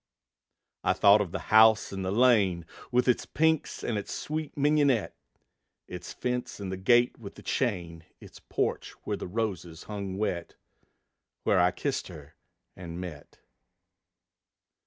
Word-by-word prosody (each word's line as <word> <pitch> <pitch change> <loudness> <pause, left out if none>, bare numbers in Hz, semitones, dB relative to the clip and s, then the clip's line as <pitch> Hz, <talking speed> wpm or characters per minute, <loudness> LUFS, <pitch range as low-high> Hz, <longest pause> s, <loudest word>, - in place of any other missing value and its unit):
I - - +3
thought 100 +1 +6
of 95 -5 -3
the - - -2 0.2
house 110 -1 +6
in 95 - -4
the 95 - -2
lane, 100 -7 +3 0.3
With 125 0 +2
its 125 - +2
pinks 160 -1 0
and 110 -3 -1
its 100 - -7
sweet 155 -1 -4
mignonette; 145 -5 +2 0.7
Its 90 -1 -8
fence 125 -2 -3
and 95 -2 -5
the - - -2
gate 120 +6 +3
with 100 -4 -10
the - - -13
chain, 85 -10 -2
Its - - -14
porch - - -2
where - - -2
the - - -6
roses 90 -5 -4
hung 100 -3 -5
wet, 90 -5 -3 0.9
Where - - +3
I 90 0 +5
kissed 135 +9 -3
her 75 -5 -12 0.4
and 85 -1 -8
met. 85 -5 -9
100 Hz, 145 wpm, -28 LUFS, 90-125 Hz, 0.9 s, thought